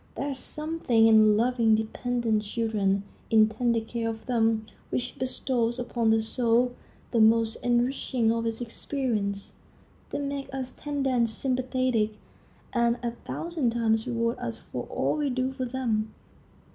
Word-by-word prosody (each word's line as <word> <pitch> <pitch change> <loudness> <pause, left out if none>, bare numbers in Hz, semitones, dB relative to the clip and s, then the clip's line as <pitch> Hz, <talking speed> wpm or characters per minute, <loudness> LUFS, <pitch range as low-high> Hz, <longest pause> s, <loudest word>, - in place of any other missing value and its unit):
There 280 - -2
is 270 -2 -3
something 300 -7 +1
in 215 -1 +6
loving 230 -1 +3
dependent 225 0 0
children, 205 -2 0 0.3
in 220 -1 +6
tender 230 +1 +1
care 230 0 -3
for 220 - -17
them, 225 -3 +1 0.2
which 250 0 -3
bestows 245 -2 0
upon 240 -2 0
the 220 0 +3
soul 240 +2 +2 0.4
the 235 - +2
most 225 0 +4
enriching 245 -1 +1
of 230 0 -1
its 225 +1 -3
experience. 225 -5 -3 0.6
They - - -3
make 280 -1 -4
us 260 -1 -4
tender 285 -2 -2
and 235 -2 +2
sympathetic, 255 -2 0 0.6
and 235 -1 +2
a 235 - 0
thousand 295 +1 -3
times 225 -1 +1
reward 230 0 -1
us - - -4
for - - -6
all - - -1
we 295 -2 0
do 255 +1 -1
for 260 -1 -3
them. 235 -4 -1
235 Hz, 145 wpm, -27 LUFS, 225-255 Hz, 0.6 s, in